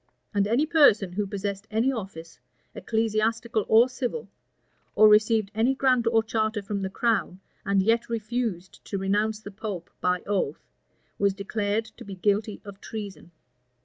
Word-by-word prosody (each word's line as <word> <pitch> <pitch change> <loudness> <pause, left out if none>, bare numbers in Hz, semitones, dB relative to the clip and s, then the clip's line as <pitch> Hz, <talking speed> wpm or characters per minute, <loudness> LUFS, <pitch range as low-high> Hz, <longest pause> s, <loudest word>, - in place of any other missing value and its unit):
And 200 -1 +2
any 240 +8 +2
person 285 - +4
who 205 +1 -1
possessed 200 +1 -4
any 225 +5 +1
office, 190 -9 -7 0.3
ecclesiastical 225 0 -1
or 225 +3 +6
civil, 260 - -4 0.7
or 215 - +7
received 215 -1 +4
any 230 +5 +2
grant 255 -3 +2
or 225 -1 +3
charter 220 -1 -1
from 200 0 -3
the 190 - -2
crown, 200 -3 0 0.3
and 195 -1 +3
yet 230 +3 +1
refused 225 -5 -3
to 200 - -3
renounce 210 +3 0
the 205 - -9
pope 195 -4 -6
by 180 0 0
oath, 190 -8 -2 0.5
was 200 -1 +2
declared 205 +2 -2
to - - -10
be 200 -1 -8
guilty 205 +3 0
of 200 -1 -11
treason. 200 -6 -7
215 Hz, 150 wpm, -26 LUFS, 195-225 Hz, 0.7 s, or